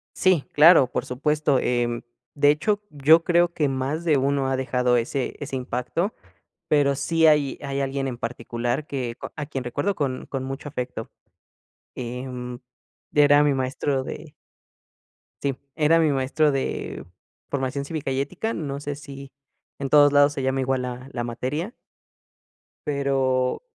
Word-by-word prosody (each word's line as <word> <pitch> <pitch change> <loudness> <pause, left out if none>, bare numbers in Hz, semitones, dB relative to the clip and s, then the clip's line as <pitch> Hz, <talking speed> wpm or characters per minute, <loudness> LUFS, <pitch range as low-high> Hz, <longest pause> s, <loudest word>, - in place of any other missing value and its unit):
Sí, 185 -6 +3
claro, 155 -2 +7
por - - -2
supuesto. 145 +2 +1
Em, 120 -1 0 0.3
de 145 0 +4
hecho, 205 +8 0
yo 155 +3 +5
creo 175 0 +3
que 155 -3 0
más 135 +4 -2
de 155 -4 +4
uno 135 0 +1
ha 135 - +1
dejado 125 -1 +1
ese 125 +3 -2
ese 140 -2 -5
impacto, 130 - -2 0.5
pero 145 -2 +3
sí 160 +4 +2
hay 150 -3 +3
hay 140 0 -3
alguien 135 0 -1
en 125 -2 -4
particular 120 +4 -3
que 125 -4 -4 0.2
a 150 - -4
quien 135 -3 -5
recuerdo 145 +11 -1
con 135 -7 -3
con 135 -2 -4
mucho 135 +2 -6
afecto. 125 -5 -5 0.9
Em, 125 0 -6 0.5
era 145 0 +6
mi 145 -1 +3
maestro 130 +1 -1
de 150 +2 -8 1.1
sí, 140 -2 -1 0.2
era 160 +1 +4
mi 160 -2 +3
maestro 140 +3 +2
de, 130 - -3 0.4
Formación 140 0 -2
Cívica 150 -2 -3
y 135 +1 0
Ética, 220 +10 -3
no 140 -3 -4
sé 145 0 -4
si, 140 -1 -10 0.5
en 140 -1 -4
todos 145 0 +6
lados 145 0 +5
se 140 - -3
llama 130 0 0
igual 130 0 0
la 125 +1 -6
la 120 -4 -3
materia. 130 - -3 1.1
Pero, 135 - 0
140 Hz, 150 wpm, -24 LUFS, 130-150 Hz, 1.1 s, claro